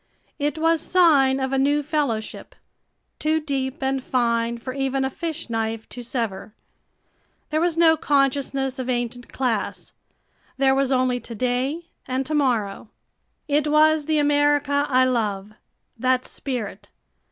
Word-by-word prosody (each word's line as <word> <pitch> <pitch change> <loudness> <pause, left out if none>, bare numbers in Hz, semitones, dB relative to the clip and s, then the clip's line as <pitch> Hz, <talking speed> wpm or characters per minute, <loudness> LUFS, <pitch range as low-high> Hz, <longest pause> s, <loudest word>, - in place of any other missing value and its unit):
It 295 +1 -1
was 325 0 +2
sign 290 -8 +4
of 265 0 -2
a 270 - +2
new 290 +2 +2
fellowship, 280 -8 -3 0.6
too 310 +1 +1
deep 270 -3 -3
and 265 0 0
fine 235 -2 0
for 255 +2 -6
even 270 0 -1
a 265 - -2
fish 330 +2 -5
knife 225 -1 -3
to 245 - -7
sever. 225 -4 -4 1.0
There 310 +1 +1
was 340 -1 +1
no 330 -1 +6
consciousness 275 -2 0
of 255 0 -4
ancient 245 0 -3
class. 240 -6 -2 0.7
There 270 0 +4
was 270 0 +1
only 255 -1 +2
to 235 - -9
day 255 +8 -1 0.2
and 260 +1 -1
to 310 - -3
morrow. 230 -8 0 0.6
It 295 0 +1
was 305 0 +4
the 310 -1 +2
America 290 -1 +2
I 255 -1 +4
love 210 -5 -1 0.5
that 255 +1 +1
spirit. 215 -6 -5
265 Hz, 140 wpm, -23 LUFS, 245-295 Hz, 1.0 s, no